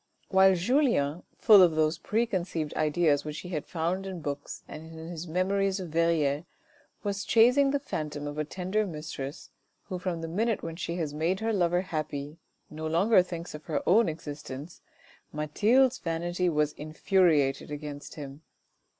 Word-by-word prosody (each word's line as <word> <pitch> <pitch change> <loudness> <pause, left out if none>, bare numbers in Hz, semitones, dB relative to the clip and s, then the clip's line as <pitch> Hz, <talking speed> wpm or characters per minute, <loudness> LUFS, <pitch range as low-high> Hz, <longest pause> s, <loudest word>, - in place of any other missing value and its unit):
While 190 0 +6
Julien, 180 - +1 0.2
full 210 -4 +8
of 170 -3 +5
those 155 +1 +1
preconceived 185 -7 -1
ideas 155 -1 +2
which 150 0 -5
he 180 - -9
had 155 -5 -4
found 180 +3 -2
in 185 -2 -5
books 145 0 -5
and 160 +1 -9
in 160 0 -9
his 175 0 -6
memories 195 +3 0
of 180 -3 -6
Verrieres, 160 -3 +1 0.6
was 200 -1 -2
chasing 250 +6 +5
the 285 - +2
phantom 150 - -5
of 145 +1 -5
a - - +1
tender 190 +6 -2
mistress, 150 -3 -7 0.3
who 185 -3 -5
from 175 -2 -3
the 165 - -4
minute 220 +6 -1
when 165 -1 -5
she 170 0 -4
has 160 -4 -3
made 165 +5 0
her 225 0 0
lover 175 -2 +2
happy 155 -3 -5 0.3
no 155 +1 -5
longer 185 +6 +4
thinks 175 -1 -6
of 150 0 -9
her - - -3
own 210 +2 +5
existence, 150 0 -8 0.5
Mathilde's 220 - +2
vanity 175 +2 -1
was 150 -2 +1
infuriated 155 -3 +1
against 145 -1 -7
him. 140 -1 -8
170 Hz, 160 wpm, -28 LUFS, 150-190 Hz, 0.6 s, full